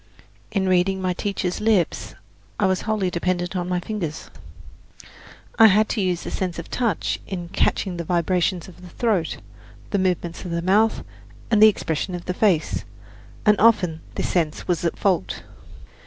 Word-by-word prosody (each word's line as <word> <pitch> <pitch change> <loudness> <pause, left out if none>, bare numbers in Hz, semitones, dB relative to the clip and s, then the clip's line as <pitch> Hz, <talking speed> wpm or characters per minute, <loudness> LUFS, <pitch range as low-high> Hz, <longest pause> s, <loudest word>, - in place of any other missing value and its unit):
In 190 -2 0
reading 185 +1 +2
my 185 -1 0
teacher's 185 -1 -2
lips 215 -6 +1 0.4
I 205 - +3
was 185 -1 +1
wholly 200 -4 0
dependent 175 +1 -1
on 180 -1 -2
my 180 -1 0
fingers: 175 -5 -5 1.3
I 225 - +10
had 215 +2 +4
to 220 - -1
use 180 -2 0
the - - -5
sense 185 -2 -3
of 170 - -8
touch 235 -4 -1
in 175 -3 -5
catching 180 0 0
the 170 - -3
vibrations 175 +1 0
of 180 -1 -14
the 180 - -11
throat, 195 -4 0 0.5
the 200 - +1
movements 180 -2 -1
of 180 - -6
the 170 0 -2
mouth 210 +5 +3 0.5
and 215 -2 +4
the 215 - +10
expression 180 -2 -2
of 175 - -7
the 180 - -2
face; 180 -5 +1 0.6
and 210 -1 +6
often 185 -8 +3
this - - -1
sense 160 -4 -1
was 175 -2 0
at 170 - -1
fault. 185 - 0
185 Hz, 170 wpm, -23 LUFS, 175-200 Hz, 1.3 s, I